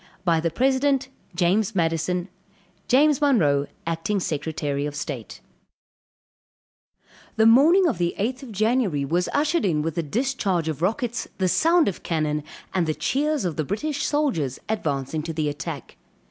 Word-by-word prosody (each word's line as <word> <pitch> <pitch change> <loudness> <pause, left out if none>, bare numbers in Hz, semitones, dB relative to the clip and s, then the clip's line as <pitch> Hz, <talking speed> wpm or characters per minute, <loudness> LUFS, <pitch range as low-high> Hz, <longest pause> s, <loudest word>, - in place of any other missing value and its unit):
"By 165 -2 +3
the 165 +1 0
President, 270 - +1 0.3
"JAMES 195 +5 +1
MADISON 170 +1 0 0.6
"JAMES 290 +3 +4
MONROE, 150 - +3 0.2
"Acting 165 +5 -1
Secretary 150 -3 -2
of 145 - -7
State." 140 -6 -6 1.9
The 220 - +3
morning 305 +12 +6
of 265 - 0
the 175 0 0
eighth 250 +6 -2
of 265 -4 -9
January, 215 - +1
was 175 +5 0
ushered 305 +4 +1
in 155 -6 +1
with 165 0 -2
the 170 - -1
discharge 195 - -1
of 155 -1 -3
rockets, 230 +6 -1
the 190 - +1
sound 330 - +3
of 195 - -3
cannon, 155 -2 -1 0.3
and 180 -3 +1
the 155 - 0
cheers 295 -2 0
of 170 -4 -2
the 155 - 0
British 285 - -3
soldiers 245 - 0
advancing 155 -8 -2
to 165 +1 -5
the 155 -1 -1
attack. 145 -1 -7
180 Hz, 150 wpm, -24 LUFS, 155-260 Hz, 1.9 s, morning